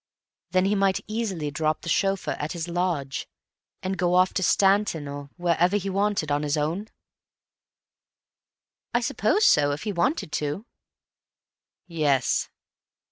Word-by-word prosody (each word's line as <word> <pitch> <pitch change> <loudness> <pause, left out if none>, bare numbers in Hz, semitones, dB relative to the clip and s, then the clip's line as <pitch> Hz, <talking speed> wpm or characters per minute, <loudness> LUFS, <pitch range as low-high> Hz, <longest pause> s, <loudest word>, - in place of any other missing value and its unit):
"Then 185 0 +2
he 200 - +2
might 195 -1 +2
easily 200 -9 -3
drop 155 +1 -1
the - - -10
chauffeur 195 +2 +1
at 150 - -3
his 170 -1 -4
lodge 170 -6 -2 0.5
and 190 0 -3
go 180 0 +2
off 185 +1 +4
to - - 0
Stanton, 195 -5 +2
or 140 0 -7
wherever 175 +2 +2
he 195 -1 -3
wanted 200 -5 0
to, - - +1
on 145 - +1
his 150 0 0
own?" 165 +8 -1 2.1
"I - - +3
suppose 425 - +2
so—if 145 0 +3
he 215 - -2
wanted 180 - 0
to." 150 +10 -2 1.2
"Yes." 150 -7 +1
175 Hz, 135 wpm, -25 LUFS, 150-195 Hz, 2.1 s, off